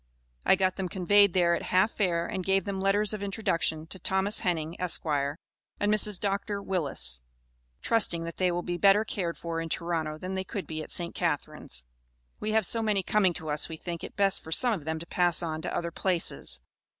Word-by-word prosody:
I - - +7
got 185 -1 0
them 190 -2 -2
conveyed 200 +1 +4
there 175 -2 +4
at - - 0
half 185 +4 +2
fare, 170 -5 0
and 185 +1 -3
gave 195 0 +1
them 195 -1 -3
letters 205 +2 +2
of 210 - -4
introduction 185 -6 -1
to 190 +3 -9
Thomas 190 +3 +1
Henning, 165 -2 -1
Esq., 180 -2 0
and 145 -3 +1 0.7
Mrs. 210 -2 +3
Dr. 200 0 -1
Willis, 140 - 0 0.6
trusting 190 -7 +2
that 170 0 -6
they 185 -1 +2
will 175 0 -2
be 175 0 -3
better 200 +4 +5
cared 175 -5 -3
for 165 -1 -3
in 165 - -5
Toronto 160 -2 -2
than 185 +4 -5
they 190 0 -2
could 195 0 -5
be 155 -1 -5
at - - -8
St. 170 -1 -3
Catharines. 60 - -3 0.6
We 215 - -2
have 220 -2 +3
so 230 +5 +1
many 210 -3 +1
coming 190 -2 +2
to 160 -2 -5
us 150 +2 +4
we 160 - -6
think 170 0 -6
it - - -8
best 200 -1 +1
for 160 - -10
some 245 +7 +2
of 165 -8 -5
them 160 0 -2
to 165 - -7
pass 175 -1 +2
on 160 -1 -3
to - - -4
other 170 -1 -3
places. 170 - -1
180 Hz, 210 wpm, -28 LUFS, 165-195 Hz, 0.7 s, I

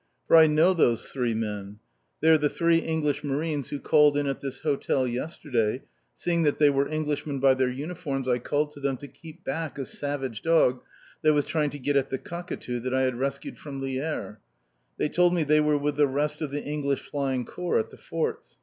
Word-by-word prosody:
For - - +6
I 160 -1 +9
know 155 +5 +4
those 120 -9 +2
three 125 -4 -1
men; 105 -2 -4 0.4
they 160 - +4
are 160 - +7
the 150 0 +2
three 170 +1 +3
English 150 -3 -1
Marines 145 0 -2
who 145 - -4
called 150 0 +4
in 145 - +1
at 135 -1 -2
this 135 -1 -5
hotel 140 -3 0
yesterday; 125 -2 -2 0.3
seeing 170 -1 0
that 150 -3 +2
they 145 -1 +5
were 140 0 +1
Englishmen 150 -2 -2
by 135 0 +5
their 130 -1 +1
uniforms 140 -1 -4
I 125 -1 +2
called 150 +4 -1
to 145 - -12
them 135 -2 -1
to 145 - -9
keep 155 +3 -14
back 155 +2 -3
a 135 - -3
savage 135 -6 -3
dog 130 -5 +3 0.4
that 155 -2 +4
was 145 -1 +2
trying 150 -2 0
to 145 - -7
get 145 +1 -1
at 135 0 +1
the 135 - -2
cockatoo 170 -7 -5
that 130 +2 -2
I 130 - +2
had 130 -2 -1
rescued 140 +1 -3
from 140 -2 -7
Lierre. 135 -6 -3 0.6
They - - +1
told 175 +3 +3
me 170 - +2
they 150 +1 +4
were 150 -1 +3
with 145 0 -1
the 145 -1 +5
rest 145 +4 -1
of 155 - -2
the 145 +1 -4
English 140 -2 -1
Flying 135 -3 -1
Corps 180 0 -1
at - - -1
the - - -13
forts. 455 0 -4
145 Hz, 215 wpm, -26 LUFS, 130-155 Hz, 0.6 s, I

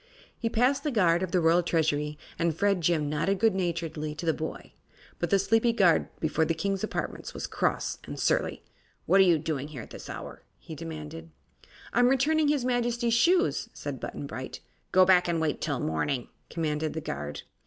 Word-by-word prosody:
He 230 - -2
passed 250 +5 +2
the 305 - 0
guard 180 -9 +3
of 185 - -1
the 185 - +3
Royal 165 +1 +4
Treasury 150 -3 0 0.2
and 165 -2 0
Fredjim 175 -6 +2
nodded 150 +7 0
good 225 +1 +3
naturedly 165 -4 -2
to 155 - -6
the 160 - +3
boy. 160 +1 -6 0.5
But - - -1
the 200 - +4
sleepy 225 +4 +2
guard 185 -7 +4
before 160 0 +1
the 165 +1 0
King's 195 +4 -2
apartments 215 - -4
was - - -4
cross - - -1
and - - -6
surly. - - 0 0.4
"What 195 - +4
are - - +9
you 175 -3 +5
doing 150 -2 -3
here 140 -7 -8
at - - -14
this - - -9
hour?" - - -7 0.2
he 160 - -10
demanded. 160 0 -7 0.6
"I'm 245 0 +5
returning 295 +4 +3
his 290 -4 +1
Majesty's 240 -1 +1
shoes," 350 - +3
said - - -5
Button - - -6
Bright. - - -7 0.3
"Go 185 0 +6
back 180 -1 +5
and 170 -1 0
wait 160 -2 -1
till 145 -5 -1
morning," 120 - -1 0.2
commanded 155 -2 -2
the 160 - -4
guard. 75 - -5
170 Hz, 185 wpm, -28 LUFS, 155-220 Hz, 0.6 s, are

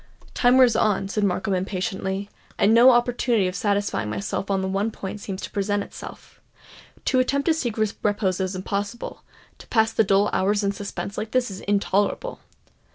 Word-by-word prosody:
"Time 245 +1 +4
wears 250 -3 +6
on," 210 -3 +1
said 205 +1 -1
Markham 195 0 0
impatiently; 190 +1 -2 0.3
"and 210 +2 +4
no 235 +3 +8
opportunity 240 -4 +2
of 185 - -3
satisfying 200 - -1
myself 105 - -3
upon 195 -1 -1
the - - -1
one 195 +3 0
point 205 -1 -7
seems 195 -1 -6
to - - -6
present 205 0 0
itself. - - -11 0.6
To 260 - +3
attempt 280 +2 +1
to 330 - +4
seek 245 -8 -3
repose 205 -3 0
is 190 0 -2
impossible; 200 +4 -4 0.4
to - - -13
pass 220 -1 +2
the 225 - +4
dull 200 +1 +2
hours 205 +2 +1
in 200 - +1
suspense 200 0 -5
like 215 +1 -4
this 255 -4 +1
is 190 - -7
intolerable!" 205 - 0
205 Hz, 175 wpm, -24 LUFS, 195-225 Hz, 0.6 s, no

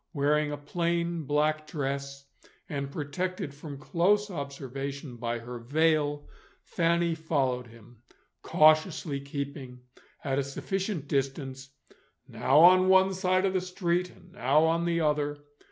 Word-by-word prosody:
Wearing 150 0 +1
a 145 - -4
plain 170 +2 -2
black 155 +2 0
dress, 140 -2 -4 0.4
and 140 -1 -4
protected 150 +2 -4
from 145 0 -9
close 195 +8 +1
observation 140 -2 -6
by 120 0 -2
her 120 +1 -8
veil, 145 +3 +1 0.4
Fanny 170 0 +1
followed 135 -6 -1
him, 115 0 -17 0.4
cautiously 155 -1 +3
keeping 140 -2 -6 0.4
at 135 -1 0
a - - +1
sufficient 185 +3 -3
distance, 135 -1 -3 0.6
now 135 +3 +1
on 185 +2 +7
one 190 0 +5
side 185 0 +1
of 190 - 0
the 185 - +1
street 180 -1 -1
and 180 - -19
now 150 -4 +2
on 165 +1 +2
the 170 -1 +1
other. 150 -1 0
150 Hz, 130 wpm, -28 LUFS, 140-170 Hz, 0.6 s, on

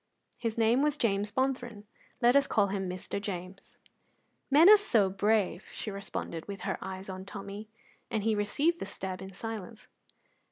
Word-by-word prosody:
His 230 -1 -2
name 230 +3 +4
was 300 0 +1
James 205 -5 +1
Bonthron; 250 -5 -2 0.4
let 240 +2 +6
us 280 0 +5
call 205 -3 +2
him 190 -1 -2
Mr. 185 +2 -4
James. 190 -1 -7 0.7
"Men 300 +5 +7
are 425 - +11
so 220 - +2
brave!" 200 -2 +1
she 215 - -5
responded, 195 -4 -5
with 200 -1 -6
her - - -2
eyes 190 0 -6
on 190 -1 -6
Tommy, 200 +1 -8 0.4
and 215 -2 -1
he 220 0 +2
received 280 +12 +1
the - - -4
stab 190 -2 -5
in 190 0 -8
silence. 220 +1 -7
205 Hz, 165 wpm, -30 LUFS, 195-235 Hz, 0.7 s, are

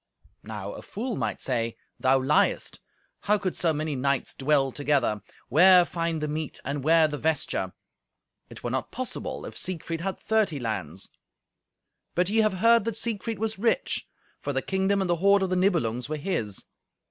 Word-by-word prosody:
Now 105 -2 -6
a - - -8
fool 240 +5 -4
might 110 -6 -3
say, 115 -3 -1 0.2
"Thou 130 0 +4
liest. 140 +3 +1 0.4
How 210 +1 +2
could 195 -3 -2
so 165 - +2
many 155 -1 -2
knights 140 0 0
dwell 135 -1 +2
together? 140 -7 +1 0.3
Where 180 +5 +7
find 165 0 -2
the 150 - -1
meat, 155 0 -4
and 140 0 -3
where 160 +1 +5
the 150 -1 -5
vesture? 145 - -1 0.8
It - - -11
were - - -2
not - - -2
possible, - - -4
if - - -8
Siegfried 165 -2 -4
had 195 +1 -3
thirty 215 -9 +1
lands." 95 - -4 1.1
But 180 +1 +2
ye 225 - +3
have 215 -2 +3
heard 230 -1 +6
that 230 -2 -2
Siegfried 225 -1 -3
was 220 -1 -2
rich, 240 - 0 0.3
for - - -3
the - - -1
kingdom 195 +1 +1
and 190 - -1
the 175 - +2
hoard 200 +2 +4
of 185 - -1
the - - +2
Nibelungs 150 - +1
were 155 - -2
his. 140 - -3
160 Hz, 175 wpm, -27 LUFS, 135-195 Hz, 1.1 s, Where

